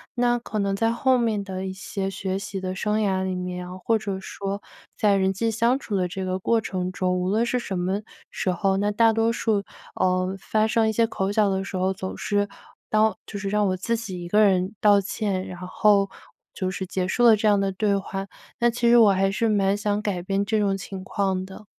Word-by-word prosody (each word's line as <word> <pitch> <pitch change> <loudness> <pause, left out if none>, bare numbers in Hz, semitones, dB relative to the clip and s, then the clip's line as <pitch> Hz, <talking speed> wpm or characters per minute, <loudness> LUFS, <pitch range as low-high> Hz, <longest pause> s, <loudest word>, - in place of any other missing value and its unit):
那 240 0 +2
可 215 -2 -4
能 200 -1 0
在 225 +3 +1
后 255 +2 +2
面 225 -4 0
的 190 -1 -5
一 190 - -3
些 195 0 -4
学 190 -1 -3
习 195 0 -5
的 185 0 -4
生 210 +2 0
涯 190 -3 +1
里 190 0 -2
面， 180 0 -5
或 225 +4 +2
者 200 -3 -4
说 195 +1 -5 0.4
在 205 -2 +3
人 190 -1 +2
际 225 +4 -1
相 235 +4 +2
处 215 - -4
的 185 -2 +1
这 190 +1 -4
个 185 0 -1
过 230 +4 +2
程 185 -3 -3
中， 185 0 0
无 180 0 -1
论 220 +4 +2
是 250 +1 0
什 195 -5 -4
么 190 +3 -1 0.3
时 185 - -1
候， 190 +2 +1
那 205 +1 +1
大 225 +2 +4
多 225 +1 +2
数， 220 -3 0 0.4
嗯， 185 0 +1
发 215 +3 0
生 220 0 +2
一 - - +1
些 230 +1 +3
口 195 -3 -2
角 210 0 +3
的 190 0 -1
时 195 -1 -5
候， 185 +1 +1
总 190 0 -6
是 205 -1 0 0.4
道 215 -1 +3
就 205 - -6
是 195 - -4
让 210 +1 +2
我 185 0 0
自 230 +5 -1
己 205 -6 -5
一 175 - -6
个 210 +5 +3
人 190 -1 +2
道 205 -1 +6
歉， 195 -1 -2
然 180 0 -7
后 200 +1 +3 0.4
就 185 - -2
是 190 0 -4
结 185 0 -2
束 240 +6 0
了 230 -2 +7
这 215 - +1
样 205 -1 +5
的 195 0 0
对 200 +1 +1
话， 195 0 -4 0.3
但 240 -1 +4
其 235 0 +1
实 240 - +7
我 220 -4 +7
还 195 +1 +2
是 225 +3 0
蛮 200 -2 +2
想 205 0 -1
改 200 -4 -2
变 195 +2 0
这 215 +2 0
种 200 -2 +1
情 195 0 -7
况 190 -2 -1
的。 190 +2 -12
200 Hz, 255 characters per minute, -24 LUFS, 190-215 Hz, 0.4 s, 了